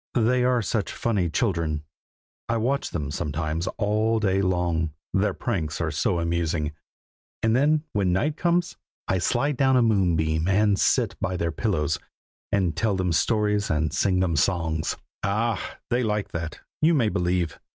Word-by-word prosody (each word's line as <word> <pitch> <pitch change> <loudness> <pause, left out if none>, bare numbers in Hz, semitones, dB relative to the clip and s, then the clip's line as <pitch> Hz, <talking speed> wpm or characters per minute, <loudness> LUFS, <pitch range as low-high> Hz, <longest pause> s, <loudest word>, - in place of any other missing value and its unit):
They 125 +1 +3
are 125 -2 +2
such 105 -1 -1
funny 100 -7 0
children! 80 -6 0 0.7
I 115 - +1
watch 130 +5 0
them 75 -4 -3
sometimes 80 +3 -2
all 110 +2 +1
day 95 -2 +1
long, 85 -4 0 0.2
their 100 +2 +1
pranks 85 -11 -2
are 85 -2 -1
so 85 +4 0
amusing; 85 -2 -1 0.7
and 110 0 +3
then 150 +3 +3
when 100 -3 +1
night 145 +12 +1
comes, 175 +1 0 0.3
I 95 - +1
slide 140 +9 0
down 130 -1 +4
a 125 - +4
moonbeam 85 -7 +2
and 100 +1 +3
sit - - +2
by 90 0 -1
their 85 -1 -1
pillows, 80 -6 0 0.5
and 95 -5 +1
tell 110 -3 +1
them 90 -2 0
stories 105 +3 +1
and 80 0 0
sing 90 -2 +2
them 85 -3 +1
songs. 80 -1 0 0.2
Ah! 110 +3 -1
they 120 +1 +2
like 105 -3 -1
that, 80 -2 -5 0.2
you 160 +2 +4
may 120 -7 +3
believe! 90 -4 -1
95 Hz, 160 wpm, -25 LUFS, 85-115 Hz, 0.7 s, down